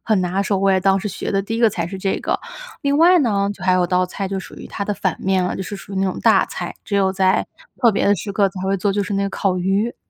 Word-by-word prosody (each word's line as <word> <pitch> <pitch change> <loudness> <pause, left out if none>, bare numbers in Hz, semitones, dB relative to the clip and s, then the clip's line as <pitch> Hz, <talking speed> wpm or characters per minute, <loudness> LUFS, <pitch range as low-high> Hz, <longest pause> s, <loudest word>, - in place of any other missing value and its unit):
很 215 -4 +1
拿 185 +2 0
手， 200 0 0
我 195 0 +2
也 190 - +3
当 195 +1 +3
时 210 - -3
学 - - -5
的 195 - +2
第 225 +3 -4
1 - - -3
个 230 - +5
菜 170 -4 -3
是 195 - -6
这 195 0 -1
个。 - - -1 0.4
另 280 0 +1
外 350 +2 +6
呢， 200 -7 +1
就 190 - -10
还 185 - +3
有 180 -1 +2
道 180 +1 +2
菜 190 +2 -5
就 195 0 -3
属 190 - -9
于 - - -9
它 200 - -5
的 205 - -1
反 - - -1
面 190 -1 +1
了， 180 - -2
就 190 - -4
是 205 - -6
属 195 - -11
于 - - -4
那 195 - +1
种 185 - -3
大 - - +4
菜。 - - -6
只 205 - -4
有 195 -1 +2
在 190 -1 +2 0.3
特 235 - +6
别 200 - 0
的 205 - +4
时 200 +2 -5
刻 195 0 +2
才 185 - -8
会 195 +1 0
做， 195 +1 0
就 205 - 0
是 200 +1 -3
那 195 - 0
个 200 - -2
烤 190 -2 0
鱼。 195 +6 0
195 Hz, 335 characters per minute, -20 LUFS, 190-205 Hz, 0.4 s, 外